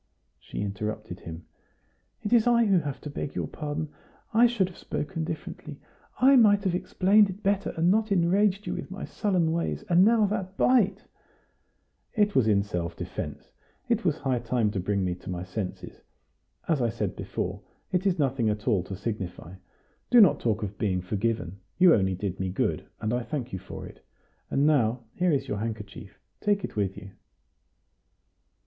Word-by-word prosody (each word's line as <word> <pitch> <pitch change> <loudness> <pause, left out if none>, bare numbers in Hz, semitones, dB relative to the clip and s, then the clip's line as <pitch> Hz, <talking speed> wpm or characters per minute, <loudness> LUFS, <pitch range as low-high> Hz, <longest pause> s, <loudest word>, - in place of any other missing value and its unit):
She - - -6
interrupted 105 -1 -4
him. 80 -1 -9 0.8
"It 205 - -1
is 235 -1 +5
I 235 -1 +5
who 195 -4 +4
have 145 -4 -4
to 150 - -6
beg 140 - -5
your - - -1
pardon. 150 0 -4 0.4
I 235 +2 +6
should 220 -6 +1
have 180 - -13
spoken 150 +3 -3
differently. 160 -2 -6 0.4
I 270 +2 +7
might 205 -4 +5
have 190 -3 +1
explained 195 +3 +3
it 190 +3 -8
better, 200 0 +1
and 170 +2 +4
not 215 +1 +1
enraged 195 +3 +2
you - - -2
with - - -6
my 195 +1 -6
sullen 185 -7 0
ways. 170 +1 -2
And 175 +1 +6
now 220 0 +5
that 195 -2 -3
bite 210 -6 +3 0.6
" - - -43
"It 205 0 +3
was 130 -8 +3
in 100 -2 +3
self 85 -4 -4
defence; - - -6 0.4
it 235 -1 +1
was 165 -5 +1
high 130 -3 0
time 115 -2 0
to 100 - -2
bring 100 +1 0
me 90 - 0
to 90 - -10
my 90 -1 -3
senses. 90 +1 -6 0.7
As 155 -5 +1
I 120 - +2
said 105 - -3
before, - - -4 0.3
it 185 +2 +1
is 185 - +2
nothing 135 -6 +1
at 105 +2 -3
all 105 -7 +3
to 95 - -6
signify. 95 -4 -5 0.6
Do 245 - +7
not 200 -8 +6
talk 110 -2 0
of 105 0 -6
being 95 -4 0
forgiven; 100 -1 -2 0.2
you 180 -2 +7
only 95 -2 +2
did 95 0 -4
me 95 0 -1
good, 90 - -1
and 110 +2 -1
I 125 - 0
thank 125 +1 -5
you 95 - -3
for - - -8
it. - - -13 0.5
And 140 - +2
now, 125 -5 +2
here 180 -1 +1
is 135 -2 0
your 105 - -2
handkerchief; 105 -3 -6 0.2
take 205 -2 +1
it - - -5
with 100 -2 -1
you." 100 - -10
140 Hz, 185 wpm, -27 LUFS, -, 0.8 s, I